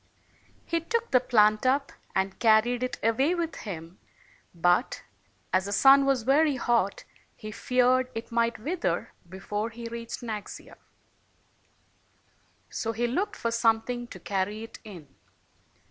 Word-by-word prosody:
He 335 Hz, -, 0 dB
took 460 Hz, +8 st, -2 dB
the 255 Hz, -, +6 dB
plant 215 Hz, -4 st, +3 dB
up 275 Hz, +2 st, +1 dB, 0.2 s
and 190 Hz, 0 st, -1 dB
carried 235 Hz, +2 st, +3 dB
it 255 Hz, -1 st, -2 dB
away 265 Hz, +10 st, +2 dB
with 335 Hz, -2 st, -2 dB
him; 170 Hz, -3 st, -8 dB, 0.5 s
but 175 Hz, +7 st, +1 dB, 0.5 s
as 185 Hz, 0 st, +2 dB
the 200 Hz, -, -4 dB
sun 275 Hz, +5 st, +6 dB
was 265 Hz, -4 st, +2 dB
very 285 Hz, +3 st, +3 dB
hot, 235 Hz, -5 st, 0 dB, 0.3 s
he 215 Hz, -, -8 dB
feared 250 Hz, +3 st, +2 dB
it 225 Hz, +1 st, -6 dB
might 235 Hz, 0 st, +1 dB
wither 335 Hz, +10 st, -2 dB, 0.2 s
before 205 Hz, +4 st, -4 dB
he 235 Hz, +1 st, -9 dB
reached 230 Hz, +1 st, -6 dB
Naxia. 215 Hz, -3 st, -7 dB, 1.9 s
So 225 Hz, -1 st, -3 dB
he 235 Hz, +2 st, -1 dB
looked 390 Hz, -, -1 dB
for 230 Hz, -, -2 dB
something 230 Hz, +1 st, +1 dB
to 185 Hz, -, -11 dB
carry 200 Hz, +4 st, -2 dB
it 225 Hz, -, -11 dB
in. 180 Hz, -9 st, -11 dB
235 Hz, 135 wpm, -27 LUFS, 210-255 Hz, 1.9 s, the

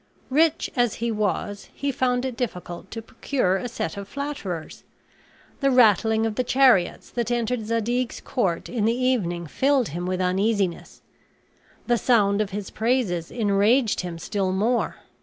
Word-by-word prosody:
Rich 315 Hz, +3 st, +2 dB
as 245 Hz, -4 st, +2 dB
he 235 Hz, 0 st, -2 dB
was, 205 Hz, -1 st, -2 dB
he 280 Hz, 0 st, -1 dB
found 250 Hz, -1 st, 0 dB
it 255 Hz, -2 st, -3 dB
difficult 180 Hz, -7 st, -5 dB
to 225 Hz, 0 st, -7 dB
procure 225 Hz, -5 st, 0 dB
a 245 Hz, -, -4 dB
set 200 Hz, -6 st, -4 dB
of 200 Hz, -1 st, -6 dB
flatterers. 210 Hz, -, -5 dB, 0.8 s
The 275 Hz, -, +2 dB
rattling 220 Hz, -3 st, +4 dB
of 225 Hz, -, -1 dB
the 255 Hz, -, 0 dB
chariots 250 Hz, -8 st, +3 dB
that 235 Hz, -2 st, -2 dB
entered 240 Hz, -2 st, -1 dB
Zadig's 230 Hz, +2 st, -1 dB
court 195 Hz, -11 st, -1 dB
in 230 Hz, -4 st, -1 dB
the 230 Hz, +2 st, +2 dB
evening 205 Hz, -10 st, 0 dB
filled 265 Hz, -, +1 dB
him 175 Hz, +4 st, -4 dB
with 185 Hz, 0 st, -1 dB
uneasiness; 190 Hz, 0 st, -1 dB, 0.8 s
the 240 Hz, -1 st, +2 dB
sound 205 Hz, -4 st, +3 dB
of 210 Hz, -, -1 dB
his 200 Hz, -1 st, -5 dB
praises 220 Hz, -8 st, 0 dB
enraged 220 Hz, +2 st, +2 dB
him 175 Hz, -2 st, -6 dB
still 190 Hz, +3 st, -2 dB
more. 220 Hz, +6 st, 0 dB
225 Hz, 155 wpm, -24 LUFS, 195-250 Hz, 0.8 s, rattling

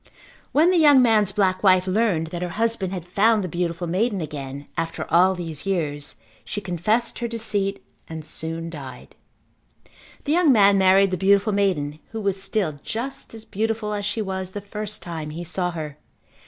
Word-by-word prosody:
When 320 Hz, +5 st, +4 dB
the 360 Hz, -, +3 dB
young 290 Hz, -4 st, +7 dB
man's 215 Hz, -4 st, +3 dB
black 190 Hz, -2 st, +1 dB
wife 185 Hz, -2 st, +5 dB
learned 185 Hz, -5 st, +1 dB
that 175 Hz, -1 st, -4 dB
her 180 Hz, -, -2 dB
husband 225 Hz, -5 st, 0 dB
had 180 Hz, -3 st, -5 dB
found 210 Hz, +4 st, +3 dB
the -, -, -2 dB
beautiful 175 Hz, 0 st, -2 dB
maiden 195 Hz, +5 st, 0 dB
again 140 Hz, -3 st, -6 dB
after 165 Hz, -1 st, -3 dB
all 185 Hz, +3 st, +5 dB
these 165 Hz, -1 st, -6 dB
years 150 Hz, -6 st, -2 dB, 0.3 s
she 205 Hz, -, -4 dB
confessed 205 Hz, +6 st, -1 dB
her 240 Hz, -, -2 dB
deceit 215 Hz, -4 st, -2 dB, 0.2 s
and 160 Hz, -1 st, -7 dB
soon 165 Hz, +1 st, -5 dB
died. 135 Hz, -5 st, -10 dB, 1.1 s
The 290 Hz, -, -2 dB
young 335 Hz, -2 st, +5 dB
man 200 Hz, -4 st, +5 dB
married 190 Hz, +1 st, +5 dB
the 185 Hz, -, 0 dB
beautiful 200 Hz, +3 st, +3 dB
maiden 155 Hz, -7 st, 0 dB
who 225 Hz, -, -3 dB
was 195 Hz, -2 st, -1 dB
still 185 Hz, -8 st, -2 dB
just 235 Hz, +1 st, -5 dB
as 220 Hz, 0 st, -11 dB
beautiful 220 Hz, 0 st, -2 dB
as 205 Hz, -1 st, -3 dB
she 210 Hz, +2 st, -1 dB
was 190 Hz, -1 st, -4 dB
the 205 Hz, -, -4 dB
first 210 Hz, +1 st, -5 dB
time 160 Hz, -3 st, -5 dB
he 165 Hz, +3 st, -6 dB
saw 180 Hz, +1 st, -2 dB
her. 155 Hz, -3 st, -6 dB
190 Hz, 180 wpm, -23 LUFS, 170-215 Hz, 1.1 s, young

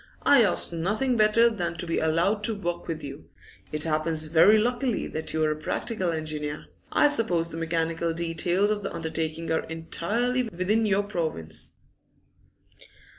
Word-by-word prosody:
I 280 Hz, -3 st, +6 dB
ask 190 Hz, -4 st, +2 dB
nothing 210 Hz, +10 st, 0 dB
better 220 Hz, +1 st, +5 dB
than 175 Hz, -7 st, -2 dB
to 175 Hz, -, -3 dB
be 165 Hz, -, 0 dB
allowed 170 Hz, +7 st, +1 dB
to 225 Hz, -, +1 dB
work 175 Hz, -3 st, -4 dB
with 160 Hz, -2 st, -4 dB
you. 140 Hz, 0 st, -9 dB, 0.4 s
It 150 Hz, 0 st, 0 dB
happens 155 Hz, 0 st, 0 dB
very 165 Hz, +7 st, +6 dB
luckily 245 Hz, +2 st, 0 dB
that 155 Hz, 0 st, -4 dB
you 160 Hz, 0 st, 0 dB
are 155 Hz, -, +2 dB
a -, -, -1 dB
practical 185 Hz, +5 st, -2 dB
engineer. 155 Hz, -2 st, -4 dB, 0.3 s
I 295 Hz, -, +5 dB
suppose 185 Hz, -, +1 dB
the 165 Hz, -, -7 dB
mechanical 165 Hz, 0 st, -1 dB
details 170 Hz, +4 st, 0 dB
of 210 Hz, -1 st, -1 dB
the 200 Hz, -, -4 dB
undertaking 160 Hz, 0 st, -3 dB
are 160 Hz, -, +1 dB
entirely 210 Hz, +10 st, -1 dB
within 215 Hz, 0 st, 0 dB
your 200 Hz, 0 st, +2 dB
province. 160 Hz, -, -4 dB
170 Hz, 160 wpm, -26 LUFS, 160-215 Hz, 0.4 s, I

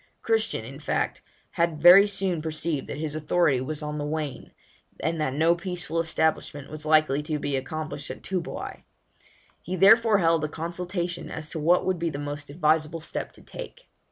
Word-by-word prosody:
Christian, 225 Hz, -, 0 dB
in 135 Hz, +4 st, -9 dB
fact, 155 Hz, -, -1 dB, 0.3 s
had 170 Hz, -2 st, 0 dB
very 180 Hz, +5 st, +9 dB
soon 195 Hz, -5 st, 0 dB
perceived 155 Hz, -2 st, -2 dB
that -, -, -5 dB
his 155 Hz, -1 st, -3 dB
authority 155 Hz, -3 st, +2 dB
was 150 Hz, +3 st, -4 dB
on 150 Hz, 0 st, -4 dB
the -, -, -2 dB
wane, 150 Hz, -2 st, -4 dB, 0.5 s
and 160 Hz, +1 st, -1 dB
that 135 Hz, -3 st, -1 dB
no 165 Hz, +3 st, +4 dB
peaceful 175 Hz, -2 st, -3 dB
establishment 160 Hz, -3 st, -1 dB
was 155 Hz, 0 st, -7 dB
likely 155 Hz, -2 st, +4 dB
to 150 Hz, 0 st, -2 dB
be 145 Hz, -1 st, -2 dB
accomplished 150 Hz, +1 st, -4 dB
at -, -, -8 dB
Toobouai; 185 Hz, -3 st, -4 dB, 0.8 s
he 185 Hz, -, -4 dB
therefore 215 Hz, +3 st, +6 dB
held 165 Hz, -3 st, +2 dB
a 155 Hz, -, -1 dB
consultation 175 Hz, +2 st, -4 dB
as 155 Hz, -1 st, -7 dB
to 160 Hz, -, -4 dB
what 170 Hz, +4 st, +3 dB
would 185 Hz, -2 st, 0 dB
be 170 Hz, 0 st, 0 dB
the 145 Hz, -, -5 dB
most 145 Hz, 0 st, -5 dB
advisable 155 Hz, +1 st, +1 dB
step 160 Hz, -, -4 dB
to -, -, -15 dB
take. -, -, -10 dB
160 Hz, 180 wpm, -26 LUFS, 150-175 Hz, 0.8 s, very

